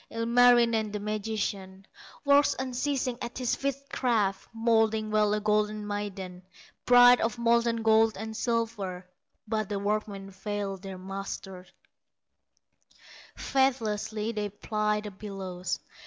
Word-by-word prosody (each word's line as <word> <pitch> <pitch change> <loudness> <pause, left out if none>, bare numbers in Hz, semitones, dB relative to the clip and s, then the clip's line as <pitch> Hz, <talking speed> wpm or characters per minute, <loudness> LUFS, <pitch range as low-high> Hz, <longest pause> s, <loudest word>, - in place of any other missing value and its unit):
Ilmarinen, 235 -1 +4
the 210 - -3
magician, 205 -2 -4 0.4
Works 285 0 +5
unceasing 255 -1 -2
at 235 - -5
his 250 -2 -1
witchcraft, 250 -7 -1
Moulding 225 -1 +1
well 210 -1 +3
a - - -1
golden 210 0 0
maiden, 200 -3 -5 0.5
Bride 245 0 +8
of 230 +1 -1
molten 235 -1 +2
gold 220 0 +4
and 220 +2 -6
silver; 220 -6 -2 0.4
But 215 -2 -2
the 205 - -2
workmen 200 -1 -3
fail 195 0 -4
their 190 0 -8
master, 190 -1 -7 1.7
Faithlessly 225 -5 0
they 210 -2 -3
ply 210 +1 -1
the 210 -1 -7
bellows. 190 -3 -5
215 Hz, 110 wpm, -28 LUFS, 200-235 Hz, 1.7 s, Bride